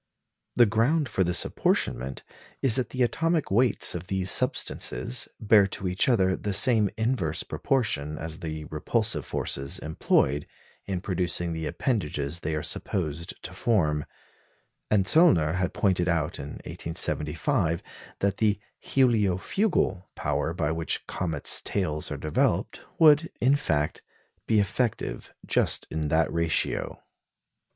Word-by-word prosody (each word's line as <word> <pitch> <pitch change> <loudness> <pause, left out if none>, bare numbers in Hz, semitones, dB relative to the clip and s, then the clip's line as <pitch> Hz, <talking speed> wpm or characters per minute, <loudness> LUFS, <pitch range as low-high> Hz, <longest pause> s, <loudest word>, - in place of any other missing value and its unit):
The 120 - +7
ground 120 +8 +2
of 95 - +3
this 90 0 +2
apportionment 65 +1 -1 0.4
is 130 -4 +4
that 130 - -1
the 130 -1 0
atomic 165 - 0
weights 120 +5 +3
of 90 +1 -6
these 95 -1 +1
substances 60 - 0
bear 105 -2 +5
to 95 0 -4
each 90 +7 +1
other 95 -6 +3
the 100 -2 -2
same 110 -5 +4
inverse 110 -9 -1
proportion 75 - -1
as 80 0 -5
the 80 -3 -5
repulsive 80 - -1
forces 70 +1 -2
employed 75 -2 +1 0.4
in 95 -3 -2
producing 90 -2 -1
the 80 -1 -3
appendages 85 - -2
they 80 -1 -2
are 75 - -3
supposed 85 -3 -4
to - - -6
form; 75 - +1 0.8
and 100 -3 +3
Zöllner 90 - +4
had 90 0 0
pointed 90 -3 +1
out 80 -4 -1
in 70 +2 -6
1875 85 - -1 0.4
that 100 0 +1
the 105 -2 +2 0.2
"heliofugal" 110 - +1
power 75 +2 -1
by 75 -3 0
which 80 0 -1
comets' 80 -5 -1
tails 75 -6 -2
are - - -3
developed 75 -1 0 0.2
would, 155 0 +5
in 130 +4 +4
fact, 75 - -1 0.5
be 110 - +3
effective 100 - -2
just - - +1
in 80 -1 -2
that 80 +2 +1
ratio. 85 -1 -1
90 Hz, 130 wpm, -27 LUFS, 80-110 Hz, 0.8 s, The